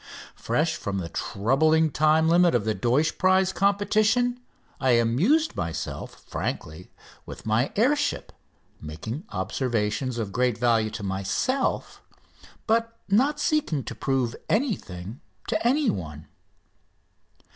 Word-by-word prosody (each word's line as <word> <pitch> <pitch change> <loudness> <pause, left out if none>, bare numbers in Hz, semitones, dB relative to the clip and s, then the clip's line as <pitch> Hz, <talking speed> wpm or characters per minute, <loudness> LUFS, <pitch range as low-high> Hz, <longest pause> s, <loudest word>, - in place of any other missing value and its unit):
Fresh - - -1
from 100 -1 -4
the 85 -3 -4
troubling 155 - +1
time 155 +2 +3
limit 170 -2 +4
of 110 -4 +1
the 110 - +1
Deutsch 130 +8 +1
prize 185 0 +3
competition 215 +5 +2 0.4
I 130 -2 +3
amused 155 - +2
myself 85 -1 -5
frankly 80 +4 -5 0.4
with - - -9
my 110 +4 +1
air 250 +8 +4
ship, 290 0 -3 0.5
making 110 - -6
observations 115 +4 -2
of 110 -4 -3
great 125 0 +1
value 115 -2 +2
to 110 -1 -7
myself, 100 - -1 0.6
but 230 +1 0
not 270 +9 +2
seeking 290 - 0
to - - -6
prove 130 -3 -1
anything 130 - -2 0.3
to - - +1
anyone. 95 - -1
135 Hz, 115 wpm, -25 LUFS, -, 0.6 s, limit